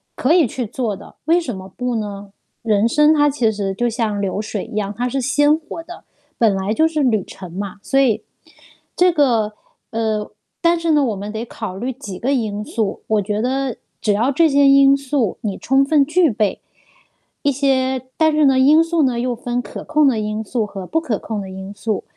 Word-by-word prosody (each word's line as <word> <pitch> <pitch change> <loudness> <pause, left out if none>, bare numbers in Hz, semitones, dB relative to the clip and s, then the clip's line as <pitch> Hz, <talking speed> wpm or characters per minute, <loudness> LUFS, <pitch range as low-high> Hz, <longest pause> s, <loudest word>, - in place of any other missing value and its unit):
可 285 +6 +2
以 345 -5 +5
去 245 +1 -4
做 220 -3 -2
的， 195 - -14
为 335 +2 +4
什 245 - -4
么 190 0 -9
不 250 -1 -2
呢？ 205 -2 -5 0.3
人 215 -1 +2
生 300 +5 +4
它 295 -1 +4
其 245 -6 +1
实 195 -2 -3
就 240 +3 0
像 220 -3 -1
流 200 +1 -2
水 215 -2 -4
一 - - -12
样， 205 -1 -2
它 245 +1 0
是 270 +2 -2
鲜 290 +3 +3
活 325 +1 -8
的， 350 +2 -11 0.4
本 220 -4 +4
来 195 +3 -1
就 320 +7 +3
是 310 -3 -1
旅 220 -7 +2
程 185 -3 -11
嘛。 200 0 -5
所 270 - +1
以， 225 -5 +1 0.7
这 360 0 +4
个 235 -9 +2 0.4
呃， 220 -2 -2 0.3
但 340 0 +3
是 335 -1 -2
呢， 295 -2 +4
我 220 -4 -1
们 205 +2 -6
得 220 +2 -4
考 220 -5 -6
虑 250 +4 -3
几 205 -8 -8
个 270 +7 0
因 210 -4 -2
素， 215 -4 -3
我 215 -1 +1
觉 210 +1 -2
得 260 0 -1 0.2
只 210 - +2
要 235 +7 +1
这 320 +3 +3
些 280 0 +4
因 275 0 +6
素 270 -6 -1
你 205 -3 -3
充 270 +1 +2
分 290 -1 +4
具 320 0 +2
备， 210 -1 -1 0.8
一 285 - +3
些 260 -1 0
但 315 -1 +3
是 305 0 +3
呢 265 -2 +4
因 300 +5 +6
素 330 -1 0
呢， 250 -3 +1
又 245 +1 -1
分 245 +1 -3
可 - - -9
控 305 -1 +3
的 240 -5 +3
因 215 +1 -3
素 220 +1 -2
和 195 -2 -7
不 325 - 0
可 245 -10 -2
控 220 -2 -5
的 190 -1 -6
因 190 +1 -8
素。 215 0 -3
240 Hz, 235 characters per minute, -19 LUFS, 210-280 Hz, 0.8 s, 因